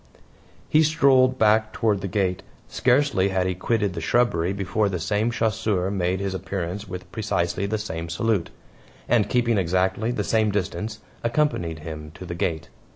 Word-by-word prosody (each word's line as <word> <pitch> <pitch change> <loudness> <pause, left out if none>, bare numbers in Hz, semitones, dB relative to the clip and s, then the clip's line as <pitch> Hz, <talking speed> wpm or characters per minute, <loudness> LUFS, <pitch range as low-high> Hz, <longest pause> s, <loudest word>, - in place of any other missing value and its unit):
He 155 - +4
strolled 135 -5 +4
back 110 0 +3
toward 105 -4 +1
the 100 - -3
gate. 95 -1 0 0.3
Scarcely 125 -7 +2
had 95 -1 0
he 95 - 0
quitted 100 +1 0
the - - -5
shrubbery 95 -8 +2
before 100 +1 0
the 95 - -2
same 105 +7 0
chasseur 110 -4 0
made 90 -1 0
his 100 -1 -2
appearance 95 +1 -4
with 90 0 -8
precisely 100 -3 -1
the 110 +2 -1
same 85 -5 -5
salute; 100 +2 0 0.6
and, 105 -4 +2
keeping 120 -3 +2
exactly 95 +5 0
the 120 - -1
same 110 -1 +2
distance, 105 +2 -3 0.2
accompanied 115 - 0
him 75 -1 -7
to 95 - -9
the 85 - -5
gate. 80 -2 -2
100 Hz, 160 wpm, -24 LUFS, 90-115 Hz, 0.6 s, He